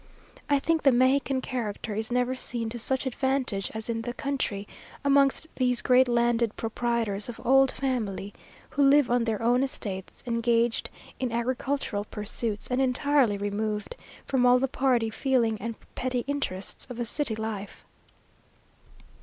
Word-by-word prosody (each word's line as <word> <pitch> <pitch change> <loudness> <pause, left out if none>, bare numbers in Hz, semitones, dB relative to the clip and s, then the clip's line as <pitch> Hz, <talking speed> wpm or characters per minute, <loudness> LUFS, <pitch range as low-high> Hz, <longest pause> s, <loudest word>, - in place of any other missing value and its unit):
I 285 - +4
think 320 +3 +1
the 275 - +5
Mexican 260 +2 +2
character 225 -4 -4
is 220 +2 -3
never 250 +1 +1
seen 235 -3 -1
to 240 +1 -5
such 265 +4 +1
advantage 260 -6 0
as 220 0 -5
in 230 -1 -2
the 240 +1 -5
country, 260 -8 -2 0.4
amongst 280 +1 +4
these 250 -2 +1
great 255 0 +5
landed 235 -2 +1
proprietors 225 -2 -1
of 240 - -7
old 270 +1 +5
family, 210 -7 -3 0.4
who 285 - 0
live 280 -2 +5
on 245 -1 +2
their 220 -3 -1
own 245 +2 +3
estates, 200 -8 -4
engaged 235 -1 +1 0.3
in 255 -2 -1
agricultural 240 -2 -2
pursuits, 210 0 -3
and 250 +1 +2
entirely 265 -3 +2
removed 210 - -3 0.3
from 260 -2 +1
all 250 0 +6
the 265 +2 +1
party 250 -4 +1
feeling 230 -3 +1
and 230 +1 -4 0.2
petty 255 -1 -1
interests 270 -10 -3
of 245 -1 -7
a 240 - -1
city 245 -1 -1
life. 215 -2 -6
240 Hz, 150 wpm, -27 LUFS, 220-265 Hz, 0.4 s, all